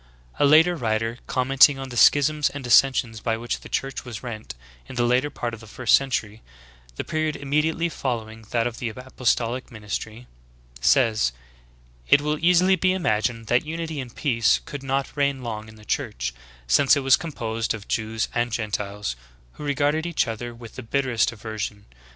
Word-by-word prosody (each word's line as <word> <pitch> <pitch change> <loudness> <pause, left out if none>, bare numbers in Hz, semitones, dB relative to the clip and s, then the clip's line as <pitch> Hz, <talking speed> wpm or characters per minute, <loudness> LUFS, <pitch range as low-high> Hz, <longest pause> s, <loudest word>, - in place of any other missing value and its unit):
19. 145 - +5
A - - +3
later 165 +4 +6
writer 115 -3 -1
commenting 135 +2 +4
on 135 0 -6
the 120 - -8
schisms 145 +4 +4
and 145 -1 -7
dis 125 -2 +1
sensions 125 -4 +4
by 115 0 0
which 120 +1 -3
the - - -12
Church 135 0 -3
Vv^as 120 -2 -8
rent 110 -3 -7 0.3
in - - -8
the 120 -1 +1
latter 125 +4 +2
part 120 -4 -4
of 115 - -7
the 110 - -13
first 120 +2 +3
century 115 -5 -2 0.3
— - - -26
the - - -3
period 155 -1 -1
immediately 150 +4 0
following 115 -8 -4
that 115 -1 +1
of 120 -1 -4
the 120 - -2
apostolic 125 0 -2
ministry, 110 +1 -6 0.5
says: 110 - +3 0.8
'Tt 145 - +7
will 150 +1 -2
easily 180 +2 +5
be 185 0 +2
imagined 115 - 0
that 120 +3 +2
unity 160 -1 -4
and 125 -3 -7
peace 115 -7 +2
could 145 - -7
not 135 0 -2
reign 140 -2 0
long 110 -2 -5
in 110 - -14
the 105 -1 -16
Church, - - -2 0.3
since 135 - +4
it - - 0
was 135 0 +6
composed 115 -9 -3
of 105 -2 -11
Jews 110 -1 -1
and 120 0 0
Gentiles, 105 - -3 0.4
who - - -11
regarded 145 +3 0
each 170 -7 0
other 115 +2 -5
with 115 -1 -12
the - - -5
bitterest 125 -2 0
aversion. 110 -2 -6
120 Hz, 185 wpm, -24 LUFS, 110-140 Hz, 0.8 s, Tt